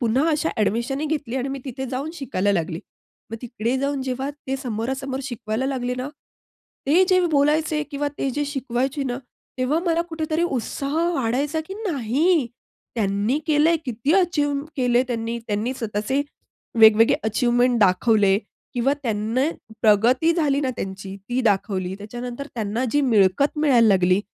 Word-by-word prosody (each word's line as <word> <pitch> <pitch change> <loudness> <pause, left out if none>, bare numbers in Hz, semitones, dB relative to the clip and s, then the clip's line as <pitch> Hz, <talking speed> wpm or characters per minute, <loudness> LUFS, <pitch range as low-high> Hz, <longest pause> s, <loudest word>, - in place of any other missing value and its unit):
पुन्हा 250 +6 +2
अशा 310 +1 0
अ‍ॅडमिशन 235 +6 0
ही 310 - -1
घेतली 285 -5 -2
आणि 265 +1 -2
मी 275 0 -4
तिथे 265 -1 -5
जाऊन 265 +5 -3
शिकायला 205 - -1
लागली. 165 -3 -1 0.5
मग 225 - -4
तिकडे 235 +1 -2
जाऊन 275 0 -1
जेव्हा 260 +1 -3 0.2
ते 270 0 -1
समोरासमोर 265 +2 -3
शिकवायला 240 -1 -3
लागले 250 -2 -2
ना, 255 +2 -4 0.8
ते 335 +7 +5
जे 370 -1 +5
बोलायचे 300 +1 +2
किंवा 290 0 -1
ते 270 - 0
जे 290 +3 -1
शिकवायचे 270 0 -2
ना, 245 -1 -2 0.4
तेव्हा 255 +5 +1
मला 335 0 +2
कुठेतरी 320 0 -1
उत्साह 275 -1 -2 0.2
वाढायचा 275 +4 0
की 385 - -5
"नाही, 290 - +1 0.5
त्यांनी 210 +4 0
केलं 305 0 +4
आहे, 335 - +4
किती 250 +3 -1
अचीव्ह 295 -7 +1
केले 250 -2 +3
त्यांनी." 230 -1 -2
त्यांनी 215 +5 -1
स्वतःचे 225 +4 -1 0.6
वेगवेगळे 220 0 +7
अचिव्हमेंट 240 +2 +2
दाखवले 200 0 +4 0.4
किंवा 255 +3 +2
त्यांना 225 +1 0 0.4
प्रगती 240 +10 +4
झाली 295 -5 +1
ना 265 - 0
त्यांची, 195 -1 -6
ती 250 +1 0
दाखवली. 195 -4 0
त्याच्यानंतर 240 +6 -6
त्यांना 220 +2 -2
जी 290 - +3
मिळकत 230 +3 +3
मिळायला 265 -7 +4
लागली. 185 -2 +4
255 Hz, 150 wpm, -23 LUFS, 225-285 Hz, 0.8 s, वेगवेगळे